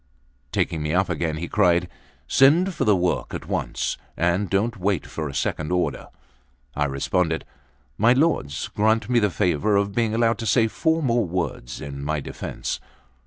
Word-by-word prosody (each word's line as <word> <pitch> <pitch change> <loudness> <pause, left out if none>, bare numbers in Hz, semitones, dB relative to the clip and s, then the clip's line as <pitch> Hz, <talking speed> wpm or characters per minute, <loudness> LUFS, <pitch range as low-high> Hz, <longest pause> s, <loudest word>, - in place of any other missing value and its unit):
Taking 80 - 0
me 75 +2 -1
up 95 +1 +2
again, 80 -1 -1
he 85 +2 -4
cried: 90 -4 +3 0.4
"Send 165 - +4
for - - -1
the 105 -2 +5
work 90 -1 -1
at - - -6
once, - - -2 0.2
and 90 +3 +1
don't 110 +4 0
wait 95 -2 0
for 80 -2 -5
a - - -7
second 80 +2 -2
order." 90 0 -1 0.7
I 75 - +1
responded: 80 +4 0 0.5
"My 115 +4 +6
lords, 130 - 0
grant 110 +3 +1
me 120 - +5
the 105 -2 +2
favour 90 +2 +1
of 100 0 +1
being 115 0 +1
allowed 115 0 +2
to 115 - -3
say 115 -1 +4
four 160 +7 0
more 120 -4 +2
words 85 -8 -3
in 70 0 -6
my 75 +1 -1
defence." - - -5
95 Hz, 170 wpm, -24 LUFS, 80-115 Hz, 0.7 s, My